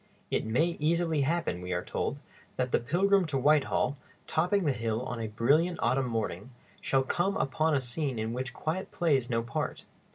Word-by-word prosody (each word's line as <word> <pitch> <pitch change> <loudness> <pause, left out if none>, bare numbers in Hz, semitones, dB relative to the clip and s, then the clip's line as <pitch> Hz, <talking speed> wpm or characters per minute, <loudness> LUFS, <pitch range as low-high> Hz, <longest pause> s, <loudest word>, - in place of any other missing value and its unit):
"It - - 0
may 160 +10 +1
easily 165 0 +1
happen," 160 - 0
we 90 0 -3
are 90 0 -2
told, - - -2 0.4
"that 125 -1 -1
the - - +3
pilgrim 185 +8 +2
to 145 -3 -1
Whitehall, 145 0 +2 0.3
topping 180 +5 +1
the 145 - +3
hill 115 -1 -2
on 120 -2 -4
a 115 - -2
brilliant 145 +11 +2
autumn 130 0 +1
morning, 110 -3 -3 0.3
shall 135 0 +2
come 180 +8 0
upon 155 +3 +1
a 135 - +2
scene 130 +1 -2
in 110 +1 -2
which 130 +1 -3
quiet 165 +8 -3
plays 140 -8 +1
no 115 -1 0
part. 115 - -3
135 Hz, 185 wpm, -29 LUFS, 115-165 Hz, 0.4 s, the